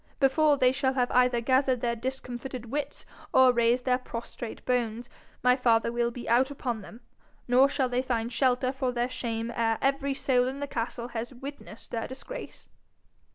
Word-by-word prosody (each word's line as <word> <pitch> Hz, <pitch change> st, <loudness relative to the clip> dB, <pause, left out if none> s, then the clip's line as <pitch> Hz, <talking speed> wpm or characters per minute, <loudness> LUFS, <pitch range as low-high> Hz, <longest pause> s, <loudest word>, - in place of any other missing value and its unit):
Before 290 Hz, +2 st, +4 dB
they 255 Hz, -1 st, +4 dB
shall 265 Hz, 0 st, 0 dB
have 250 Hz, -2 st, +1 dB
either 250 Hz, -1 st, +3 dB
gathered 260 Hz, 0 st, +2 dB
their 235 Hz, -1 st, 0 dB
discomfited 250 Hz, 0 st, -5 dB
wits 290 Hz, +1 st, -4 dB, 0.3 s
or 260 Hz, -1 st, +6 dB
raised 240 Hz, +1 st, +2 dB
their 255 Hz, -1 st, +2 dB
prostrate 235 Hz, -1 st, -7 dB
bones, 240 Hz, -1 st, -1 dB, 0.3 s
my 250 Hz, 0 st, +5 dB
father 230 Hz, -3 st, +2 dB
will 235 Hz, 0 st, +1 dB
be 240 Hz, 0 st, -8 dB
out 250 Hz, +4 st, +3 dB
upon 245 Hz, -5 st, -3 dB
them, 225 Hz, +4 st, -12 dB, 0.5 s
nor 255 Hz, +3 st, +5 dB
shall 270 Hz, -2 st, 0 dB
they 250 Hz, 0 st, 0 dB
find 235 Hz, -2 st, -2 dB
shelter 255 Hz, 0 st, +2 dB
for 265 Hz, -1 st, -1 dB
their 245 Hz, +1 st, -1 dB
shame 230 Hz, -1 st, -3 dB
ere 225 Hz, -1 st, +1 dB
every 275 Hz, 0 st, 0 dB
soul 250 Hz, -2 st, +2 dB
in 270 Hz, +2 st, -4 dB
the 285 Hz, -, -2 dB
castle 235 Hz, -1 st, -4 dB
has 235 Hz, +2 st, -5 dB
witnessed 270 Hz, -3 st, -9 dB
their 225 Hz, -1 st, -2 dB
disgrace.' -, -, -8 dB
250 Hz, 175 wpm, -28 LUFS, 235-265 Hz, 0.5 s, or